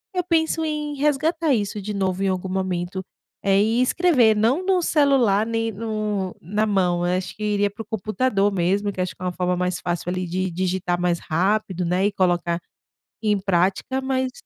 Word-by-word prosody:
eu 360 - +1
penso 325 -2 +1
em 300 -1 -3
resgatar 300 +2 +1
isso 205 -2 -1
de 210 +2 -4
novo 190 -1 -1
em - - +2
algum 185 0 -2
momento. 185 0 -2 0.4
E 210 +5 +3
escrever 255 -7 +3
não 260 - +2
no 375 -2 +3
celular, 265 -10 +3
nem 225 0 -1
no 215 -3 -3
na 210 +6 0
mão, 180 -4 +1
eu 180 +1 +1
acho 185 -1 -5
que 215 - -7
iria 205 -1 +1
para 210 +3 -9
o - - -8
computador 215 0 0
mesmo, 195 +3 +1
que 185 - -3
acho 180 - -2
que - - -23
é - - -3
uma 180 - -1
forma 180 0 -1
mais 180 0 -1
fácil, 175 0 -2
ali, 185 0 -2
de 185 +2 -2
digitar 180 0 -1
mais 175 -1 +1
rápido, 185 +2 0
não 175 +1 0
é, 190 - +2
e 205 - +2
colocar 175 -2 +1 0.6
em 210 -2 +2
prática 190 +7 0
mas 260 -1 -1
200 Hz, 195 wpm, -23 LUFS, 185-230 Hz, 0.6 s, E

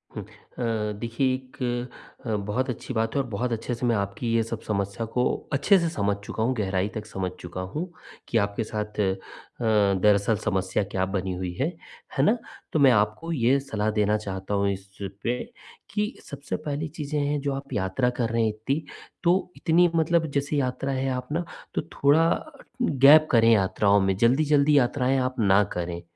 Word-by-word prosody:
हुँ। - - -4
अ, 110 -3 -4
देखिए, 120 +3 0
एक 125 -1 -4 0.4
अ, - - 0
बहुत 125 +6 -1
अच्छी 125 +1 -5
बात 115 +1 -1
है 140 - +3
और 135 - -6
बहुत 120 +3 -2
अच्छे 115 +2 -2
से 120 - -3
मैं 120 -1 +3
आपकी 100 +3 -3
ये 115 - +3
सब 115 0 -5
समस्या 100 +1 -2
को 125 - +2 0.3
अच्छे 170 +9 +5
से 170 -1 0
समझ 100 -11 0
चुका 110 - -3
हूँ, 125 +3 +2
गहराई 95 -3 0
तक 110 -1 -4
समझ 95 -4 -4
चुका 90 +1 -6
हूँ 170 +4 -3 0.4
कि 115 - +1
आपके 100 +1 0
साथ 105 -1 -5
अ, 95 -2 +2 0.9
दरअसल 105 +1 +4
समस्या 95 +1 0
क्या 95 -1 0
बनी 95 -1 -1
हुई 90 -1 -4
है, 140 - +2 0.5
है 135 - +3
ना? 220 +11 +4 0.4
तो 155 - +2
मैं 135 -2 +7
आपको 110 +10 +1
ये 135 -1 +3
सलाह 110 -6 -2
देना 105 0 +2
चाहता 95 -1 -5
हूँ 100 0 +2
इस 95 0 -6 0.4
पे 120 +1 0 0.5
कि 210 +3 -1
सबसे 140 -3 -5
पहली 150 +2 -2
चीज़ें 150 0 -4
हैं, 145 +1 0
जो 140 0 -1
आप 135 +1 -6
यात्रा 100 +6 +1
कर 115 -2 +1
रही 115 -1 +2 0.2
थीं, 145 +3 +2 0.4
तो 180 +1 +2
इतनी 175 +1 +4
मतलब 165 0 +2
जैसे 145 +1 -1
यात्रा 135 0 -1
है, 135 0 -1
आप 125 -1 -3
ना, 170 +3 -1 0.3
तो - - +1
थोड़ा 155 +4 +4 0.5
गैप 150 - +6
करें 115 -1 +5
यात्राओं 100 0 +3
में। 95 0 +1
जल्दी-जल्दी 145 +5 +4
यात्राएँ 130 0 +2
आप 130 0 -1
ना 100 -1 +5
करें, 85 -1 -4
120 Hz, 185 wpm, -26 LUFS, 105-140 Hz, 0.9 s, मैं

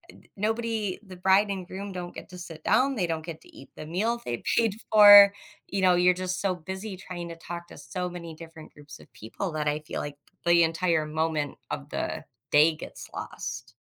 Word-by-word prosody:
ed - - -20
nobody 220 -1 -1
the 185 -2 -11
bride 190 +3 +4
and 190 -2 -4
groom 200 +1 -6
don't 180 -1 -7
get - - -9
to 180 - -10
sit 165 -3 -10
down, 270 +1 +3
they 185 - 0
don't 160 -1 -3
get 165 -2 -8
to - - -19
eat 135 - -13
the 155 - -8
meal 220 +9 -1
they 120 -1 -3 0.2
paid 225 -3 +3 0.2
for. 205 -1 +10 0.3
You 195 -1 -2
know, 180 -1 +5
you're 180 +1 +5
just 185 0 -3
so 195 -2 0
busy 190 +4 -7
trying 175 -2 -7
to 170 - -7
talk 170 +1 -8
to - - -13
so 180 +6 -4
many 170 -2 -8
different 160 -1 -12
groups 145 0 -13
of - - -18
people 140 - -5
that 150 -1 -2
I 150 +1 0
feel 155 - -6
like 145 0 -6 0.3
the 170 0 +6
entire 165 -1 +1
moment 155 -1 -2
of 70 -2 -5
the - - -3 0.3
day 155 +2 +5
gets - - -10
lost. - - -6
175 Hz, 210 wpm, -27 LUFS, 160-195 Hz, 0.3 s, for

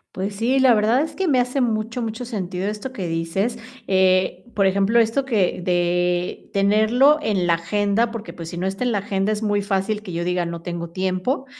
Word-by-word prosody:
Pues 200 +2 -3
sí, 245 +4 +1
la 260 -2 +6
verdad, 220 +4 +3
es 310 0 -4
que 380 +2 -1
me 270 -5 +3
hace 250 +2 0
mucho, 230 +1 -1
mucho 225 +2 -4
sentido, 190 -5 -4
esto 210 +5 -4
que 195 -9 -5
dices, 170 +8 -2 0.3
eh, 185 -1 +2
por 195 - +3
ejemplo, 200 +4 +3
esto 230 +4 +1
que 205 -8 0
de 175 0 0
tenerlo 220 +9 +4
en 200 -8 0
la 170 - +3
agenda, 205 +6 0
porque 225 -1 -7
pues, 165 -1 -8
si 175 - -7
no 180 - -2
está 195 +5 -2
en 245 - +1
la 205 - +1
agenda, 195 0 -1
es 215 0 -2
muy 205 -1 +1
fácil 200 +2 -1
que 190 -5 -8
yo 170 +1 -2
diga: 180 0 0
"No 170 0 -6
tengo 170 -1 -5
tiempo", 185 - -2
200 Hz, 210 wpm, -22 LUFS, 180-230 Hz, 0.3 s, la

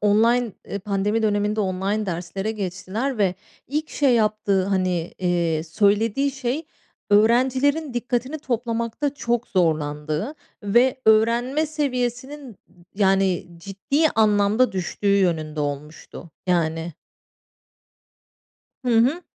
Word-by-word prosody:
online, 225 +2 +3 0.2
ııı, 200 - -3
pandemi 205 +3 -1
döneminde 210 0 +1
online 195 +2 -1
derslere 185 +4 -3
geçtiler 210 +6 -3
ve 190 -3 +2 0.3
ilk 305 +3 -2
şey 275 -4 +2
yaptığı, 210 -3 +1
hani, 185 -3 -1
eee, 170 -3 0
söylediği 210 - +1
şey, 270 +4 -3 0.4
öğrencilerin 260 +7 +3
dikkatini 245 +4 -2
toplamakta 240 +1 -2
çok 240 -3 -1
zorlandığı 155 - -1 0.3
ve 240 +6 +3
öğrenme 235 +7 +3
seviyesinin, 265 - -3 0.4
yani, 195 -3 +2
ciddi 200 - 0
anlamda 215 +2 +3
düştüğü 200 +2 0
yönünde 155 -5 0
olmuştu, 150 +3 -6 0.2
yani. 165 -1 0 1.9
Hı - - -1
hı. 285 +10 +2
210 Hz, 100 wpm, -23 LUFS, 185-245 Hz, 1.9 s, online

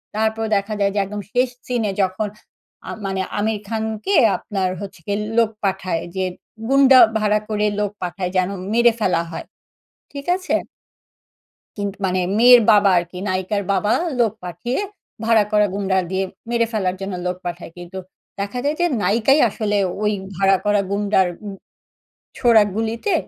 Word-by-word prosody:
তারপর 220 +1 0
দেখা 200 +2 -1
যায় 200 0 +2
যে - - +2
একদম 205 +1 -6
শেষ 250 +1 +2 0.2
সিনে 235 -5 0
যখন 190 +3 -1 0.6
আ - - -5 0.2
মানে 190 -1 -1 0.2
আমির 215 +1 0
খানকে 220 - -2 0.2
আপনার 190 -3 -2
হচ্ছে 195 -3 -8
গিয়ে 205 0 -1 0.2
লোক 230 -2 +4
পাঠায় 185 -3 -1
যে 190 0 0 0.4
গুণ্ডা 270 -1 +7 0.2
ভাড়া 210 -1 +2
করে 210 -1 0
লোক 205 -1 -1
পাঠায় 180 +1 -3
যেন 185 0 +2 0.2
মেরে 235 +1 +5
ফেলা 180 -5 +1
হয়। - - -6 0.7
ঠিক 280 -1 -7
আছে? 370 0 -1 1.2
কিন্তু 200 -1 -4
মানে 185 0 0 0.2
মেয়ের 245 +1 +8
বাবা 205 -1 +5
আরকি, 175 +1 -5
নায়িকার 190 +2 -1
বাবা, 200 +3 +1 0.3
লোক 230 -4 +3
পাঠিয়ে 180 +9 -3 0.5
ভাড়া 225 -2 +4
করা 210 0 +4
গুন্ডা 195 -1 0
দিয়ে 190 0 0 0.3
মেরে 235 -1 +2
ফেলার 190 -4 0
জন্য 195 0 -4
লোক 180 0 -1
পাঠায়। 175 -1 -6
কিন্তু 175 +2 -8 0.4
দেখা 200 +5 -3
যায় 295 +2 0
যে 350 - +4 0.2
নায়িকাই 235 +8 +3
আসলে 210 -1 -2 0.3
ওই 210 0 +2 0.2
ভাড়া 195 +1 +4
করা 205 0 +3
গুন্ডার 200 -2 +2 0.2
উ - - -4 0.9
ছোড়া 235 -4 +5
গুলিতে 225 - -1
205 Hz, 155 wpm, -20 LUFS, 190-225 Hz, 1.2 s, মেয়ের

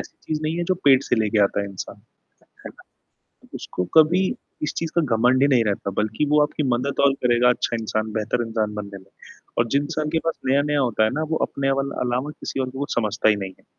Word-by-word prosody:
ऐसी - - -10
चीज़ 155 -1 -3
नहीं 155 +2 -1
है 175 - -1
जो 185 - +4
पेट 135 -2 +6
से - - 0
लेके 110 -1 +1
आता 100 +1 +1
है 100 - -3
इंसान। 95 -2 -8 0.7
है - - -5
ना? - - -18 0.7
उसको 90 - -4
कभी 165 +4 +5 0.4
इस 150 - -1
चीज़ 165 -1 -2
का - - +6
घमंड 125 +3 +3
ही 140 - +5
नहीं 125 -5 +3
रहता 100 -1 -1
बल्कि 110 +7 0
वो 150 - +5
आपकी 150 0 0
मदद 140 +3 -3
और 135 - +3
करेगा 120 0 +4
अच्छा 120 - 0
इंसान, 110 +1 -2
बेहतर 115 +2 -1
इंसान 110 -2 -2
बनने 100 -1 -6
में। 95 0 -18 0.5
और 115 0 +2
जिन 140 +5 +1
इंसान 150 0 -3
के 160 +1 0
पास 165 - -2
नया-नया 145 +2 +2
होता 120 -5 +1
है 110 - +3
ना - - 0
वो - - +2
अपने 135 0 -1
अल 135 0 -1
अलावा 125 +4 -1
किसी - - -4
और 130 -1 -1
को 130 +1 -9
कुछ 145 - -3
समझता 110 -2 +1
ही 105 - +4
नहीं 95 -2 -6
है। - - -26
125 Hz, 240 wpm, -23 LUFS, 110-145 Hz, 0.7 s, पेट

